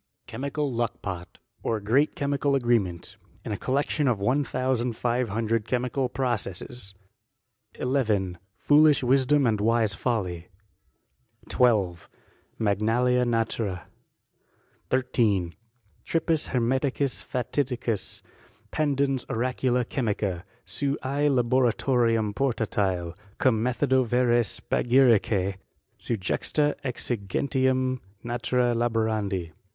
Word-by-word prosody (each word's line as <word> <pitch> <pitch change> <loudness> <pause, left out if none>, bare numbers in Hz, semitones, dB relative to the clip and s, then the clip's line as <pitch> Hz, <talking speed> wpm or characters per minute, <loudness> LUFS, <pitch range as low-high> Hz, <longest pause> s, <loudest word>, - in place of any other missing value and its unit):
Chemical 140 +1 -3
Luckpot, 95 -6 -4 0.2
or 110 - -1
great 125 +9 +2
chemical 140 -2 0
agreement; 115 -9 0 0.3
in - - -4
a - - 0
collection 140 +5 0
of 120 -4 +2
one 125 +8 +2
thousand 130 -2 -1
five 120 +1 -1
hundred 115 +1 -1
chemical 125 +2 -1
processes. 120 -4 -4 0.8
11. 105 -9 0 0.2
Foolish 150 +2 +4
Wisdom 135 +2 +3
and 110 -3 +1
wise 115 -1 +2
Folly, 90 -8 -2 1.0
12. 100 -9 +2 0.5
Magnalia 115 +4 +2
Naturee. 115 -6 -1 1.1
13. 110 -9 +1 0.5
Tripus 165 -1 0
Hermeticus 130 +2 0
fatidicus 125 -3 -2 0.5
pandens 140 -3 0
oracula 125 0 0
chemica; 105 -8 -2 0.2
seu 140 0 -2
I. 140 +3 +1
Laboratorium 120 -3 +2
portatite, 100 -8 -1 0.2
cum 115 -5 +2
methodo 130 +1 +2
vere 120 0 +3
spagyricte 115 -5 +2 0.4
seu 120 - -2
juxtaexigentiam 130 +2 -1 0.3
naturee 120 +1 0
laborandi. 110 -6 -1
120 Hz, 90 wpm, -26 LUFS, 105-130 Hz, 1.1 s, Foolish